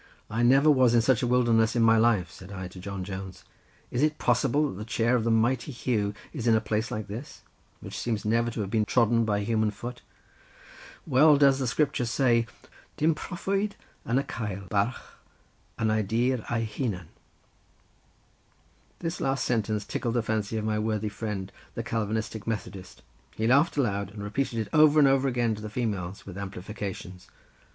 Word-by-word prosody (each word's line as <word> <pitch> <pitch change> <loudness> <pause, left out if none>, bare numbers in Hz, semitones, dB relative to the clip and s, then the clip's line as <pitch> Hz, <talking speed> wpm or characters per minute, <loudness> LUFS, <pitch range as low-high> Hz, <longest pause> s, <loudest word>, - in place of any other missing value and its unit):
"I 115 +2 0
never 135 +5 +5
was 130 -4 +4
in 115 - +5
such 125 0 +2
a 125 - 0
wilderness 120 -2 +3
in 120 - +3
my 115 0 +6
life," 110 -7 +2
said 95 +1 -12
I 95 -2 -5
to 90 - -11
John 100 0 -5
Jones, 95 -2 -7 0.5
"is 125 - -1
it 155 0 +2
possible 135 +5 +2
that 95 - -7
the - - -4
chair 115 +2 +1
of 120 - +1
the 115 - 0
mighty 120 +4 +1
Huw 110 -5 -1 0.2
is 120 -6 -3
in 115 - +5
a - - +4
place 110 +1 -2
like 105 -1 -4
this; 110 +8 -8 0.4
which - - -7
seems 110 -3 -2
never 115 +2 +2
to 110 - -4
have 100 -1 -4
been 110 -2 +2
trodden 115 0 +3
by 105 -1 0
human 110 0 +1
foot. 120 +4 -7 1.0
Well 150 +2 +5
does 140 -1 +5
the 130 - -1
Scripture 125 -2 0
say 115 -1 +2 0.5
'Dim 160 +2 +3
prophwyd 195 +5 -2 0.3
yw 120 - 0
yn 135 - +2
cael 100 -7 -5
barch 105 +4 +1 0.8
yn 110 -1 +1
ei 110 0 +2
dir 115 +4 0
ei 115 -1 0
hunan.'" 105 - -4 1.9
This 165 0 -3
last 135 -1 0
sentence 110 -3 0
tickled 120 +3 -2
the 120 - +1
fancy 110 -1 -1
of 110 - -2
my 110 0 0
worthy 110 -1 -1
friend, 100 -2 -5 0.2
the - - -3
Calvinistic 110 0 -3
Methodist; 100 -4 -5 0.3
he 110 - -1
laughed 140 +7 +3
aloud 100 -7 0
and 100 0 -8
repeated 115 +4 -2
it 110 -2 -2
over 155 0 +6
and 145 -2 +7
over 135 0 +3
again 120 -3 +1
to 105 - -7
the 110 - -6
females 105 -5 -3
with 95 -1 -8
amplifications. 95 -1 -7
115 Hz, 185 wpm, -27 LUFS, 105-125 Hz, 1.9 s, and